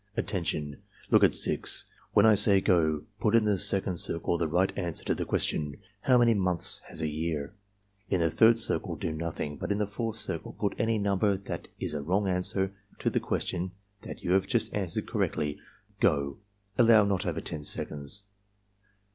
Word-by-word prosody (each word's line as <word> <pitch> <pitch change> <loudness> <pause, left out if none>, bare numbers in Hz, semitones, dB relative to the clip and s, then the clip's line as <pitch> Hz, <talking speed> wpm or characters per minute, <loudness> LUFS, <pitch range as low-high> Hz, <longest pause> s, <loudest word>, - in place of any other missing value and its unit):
"Attention! 80 -9 -2 0.3
Look - - +6
at - - +6
6. - - +3 0.3
When 105 - +5
I 110 - +7
say 100 -1 +6
'go' 80 -6 +2 0.2
put 110 +1 +2
in 115 - +5
the 105 -3 +1
second 95 0 +1
circle 85 +1 0
the 85 -1 0
right 90 +4 +1
answer 85 -4 -2
to - - +1
the - - -3
question: 75 -2 -1 0.2
'How 125 +4 +3
many 120 -1 +5
months 90 -4 +1
has - - -7
a 80 - 0
year?' 75 -1 -3 0.6
In 95 - +1
the 85 -1 +1
third 115 +5 +5
circle 115 - +1
do 80 - -3
nothing, 80 -2 -4
but - - -4
in 100 - +1
the 105 - 0
fourth 110 +2 -4
circle - - -4
put - - -2
any 115 0 +1
nimiber 100 -1 +1
that - - -6
is - - -3
a 75 - -3
wrong 95 +7 0
answer 95 +1 0 0.2
to - - -1
the - - +1
question 90 +1 -3 0.3
that - - -9
you 90 - -1
have 95 +1 +3
just 115 -2 -1
answered 95 -5 -2
correctly. 75 -1 -2 0.2
— - - -36
Go!" 70 -1 +1 0.4
(Allow 115 -3 +6
not 100 -2 -1
over 85 -1 -2
10 75 -3 -5
seconds.) 75 +7 -4
95 Hz, 190 wpm, -28 LUFS, 80-105 Hz, 0.6 s, I